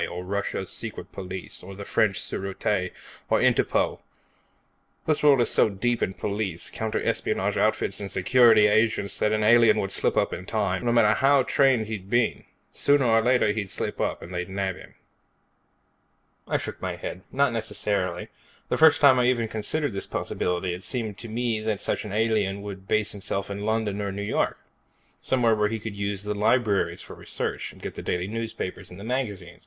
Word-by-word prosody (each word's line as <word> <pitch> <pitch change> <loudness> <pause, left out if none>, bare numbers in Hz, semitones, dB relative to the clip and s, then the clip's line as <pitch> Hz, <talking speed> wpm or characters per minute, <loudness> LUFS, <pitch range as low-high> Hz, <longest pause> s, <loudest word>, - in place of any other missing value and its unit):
or 90 +1 -6
Russia's 95 -1 -3
secret 105 -4 -6
police, 95 -1 -6
or 95 +2 -10
the 100 +1 -8
French 100 -4 +1
Sûreté, 95 -1 -2 0.4
or - - +3
Interpol. - - +2 1.1
This 155 -2 +1
world 140 -4 +5
is 120 - +3
so - - +4
deep 120 +4 -1
in 95 - -1
police, 100 -4 -3
counter 110 -1 -2
espionage - - 0
outfits - - +1
and 100 -1 -5
security 110 +2 +5
agents 105 -1 +2
that 105 - +2
an 110 0 +1
alien 115 +1 +6
would 95 - -2
slip - - +2
up - - +1
in 90 - -6
time, 100 -3 -1
no 120 - +2
matter 115 -3 +5
how 135 +4 +4
much 130 - -2
he'd 110 -8 +2
been 120 +1 +3
trained. - - -19 0.3
Sooner 140 -2 +3
or 115 -1 +4
later, 125 -3 +3
he'd 105 -3 -3
slip - - -4
up, - - -2
and 90 - -9
they'd 90 +1 -3
nab 95 -1 -2
him." - - -14 1.5
I - - +1
shook - - -7
my - - -3
head. 90 - -6
"Not 140 -2 +2
necessarily. 100 -5 -2 0.4
The - - +1
first 160 -2 +6
time 135 -3 +7
I 125 - +3
ever 120 -2 +2
considered 110 +6 -2
this 100 - -4
possibility, 90 0 -2
it 90 +2 -8
seemed 110 -6 -4
to 120 - -7
me 115 0 -1
that 110 -2 -2
such - - -2
an 105 - -6
alien 105 -2 0
would 95 -2 -8
base 110 -1 +1
himself 100 0 -3
in 100 +1 -4
London 110 -2 -1
or 100 -1 -2
New 100 +1 -4
York. 105 - 0 0.6
Somewhere 120 -3 +2
where 105 -1 +1
he 115 - -2
could 110 -1 -7
use 100 0 -3
the 105 0 -2
libraries 105 0 +1
for - - -10
research, - - -4
get - - -7
the - - -7
daily 90 0 -2
newspapers 110 -3 -5
and 90 - -11
the - - -8
magazines. 105 -8 -4
105 Hz, 190 wpm, -25 LUFS, 95-115 Hz, 1.5 s, time